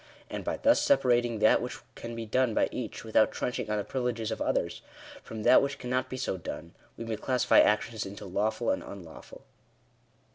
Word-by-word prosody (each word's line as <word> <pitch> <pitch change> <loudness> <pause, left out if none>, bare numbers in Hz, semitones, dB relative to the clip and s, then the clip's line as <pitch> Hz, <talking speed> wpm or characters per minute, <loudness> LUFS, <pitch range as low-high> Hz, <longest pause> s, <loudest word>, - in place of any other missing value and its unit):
And - - -4
by - - -2
thus 285 +1 +4
separating 120 - +3
that 110 - +4
which 125 +1 -5 0.2
can 115 0 -7
be 115 -1 -5
done 125 0 +1
by - - +2
each 120 -4 -5
without 110 -1 +3
trench 125 - -3
ing 110 - -4
on 105 - 0
the 105 - -1
privileges 120 -2 -2
of - - -4
others, - - -1 0.4
from 110 -1 -7
that - - +7
which 140 0 -2
cannot 130 0 -2
be 130 - -5
so 125 -7 -2
done, 85 -1 -7 0.2
we 115 - -6
may 110 -1 -3
classify 125 +1 +3
actions 110 +1 +2
into 100 +1 -8
lawful 105 +4 0
and - - -1
unlawful. 90 -5 -11
115 Hz, 195 wpm, -29 LUFS, 105-125 Hz, 0.4 s, that